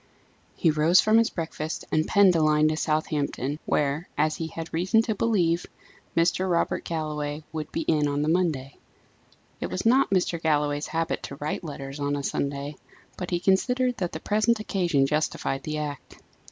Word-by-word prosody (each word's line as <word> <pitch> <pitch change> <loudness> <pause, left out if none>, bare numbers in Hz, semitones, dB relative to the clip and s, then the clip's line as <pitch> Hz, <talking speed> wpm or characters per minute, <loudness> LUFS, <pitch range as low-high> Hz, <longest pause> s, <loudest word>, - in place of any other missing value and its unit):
He 165 - +3
rose 155 +4 +4
from 215 +1 +5
his 230 - +3
breakfast 160 -2 -4
and 155 0 +1
penned 195 -3 +5
a 165 - +3
line 155 0 +4
to 155 - 0
Southampton, 150 -2 -1
where, 150 +4 0
as 155 +1 +1
he 165 - -3
had 165 0 -7
reason 185 +7 +3
to 225 - -1
believe, 180 -6 +1 0.5
Mr. 180 +3 +2
Robert 170 -1 0
Galloway 150 -2 -3
would 155 -1 -5
be 165 - -2
on 145 -2 +1
the - - -1
Monday. 155 -6 0 0.8
It - - -2
was - - -4
not 260 +4 +4
Mr. 180 -4 0
Galloway's 150 -2 +1
habit 165 0 -2
to 140 - -7
write 150 +5 -4
letters 140 -2 -7
on 145 0 0
a 140 - -3
Sunday, 140 +1 -3 0.4
but 180 - -5
he 175 - 0
considered 250 +7 +2
that 180 -2 -2
the - - -5
present 215 +2 +1
occasion 175 -9 +1
justified 145 -2 -1
the 155 +2 -4
act. 150 -2 -6
160 Hz, 175 wpm, -26 LUFS, 150-180 Hz, 0.8 s, from